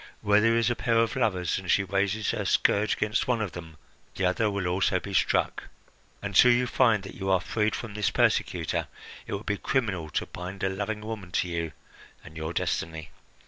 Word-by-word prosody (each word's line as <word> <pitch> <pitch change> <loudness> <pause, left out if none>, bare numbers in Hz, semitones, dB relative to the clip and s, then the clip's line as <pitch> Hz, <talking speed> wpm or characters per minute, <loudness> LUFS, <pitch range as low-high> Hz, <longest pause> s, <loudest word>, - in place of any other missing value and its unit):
Where 105 +1 +4
there 115 +1 +3
is 115 +1 +2
a - - 0
pair 115 0 +1
of 115 +2 +2
lovers, 95 -9 0
and 95 -2 -9
she 100 - +4
raises 100 +2 0
her - - -2
scourge 105 +1 +2
against 105 0 0
one 125 -2 +1
of 105 -4 -2
them, 80 -2 -10 0.4
the 95 - 0
other 100 +4 +2
will 100 -2 -2
also 90 +1 +1
be 100 +2 -8
struck. - - +1 0.6
Until 100 +5 +5
you 120 +1 +3
feel 120 -2 +3
that 100 -1 -10
you 95 -1 -4
are 95 -1 +4
freed 105 +4 -1
from 115 -3 -6
this 105 -2 0
persecutor, - - +1 0.4
it - - -5
would 100 - -7
be 105 -1 -1
criminal 100 -13 -1
to - - -2
bind 90 +2 -7
a 95 - +2
loving 105 +3 -3
woman 105 -4 -6
to 90 - +1
you 85 -2 -3 0.5
and 80 - -13
your 80 +1 -4
destiny. 80 -2 -3
100 Hz, 205 wpm, -27 LUFS, 90-110 Hz, 0.6 s, Until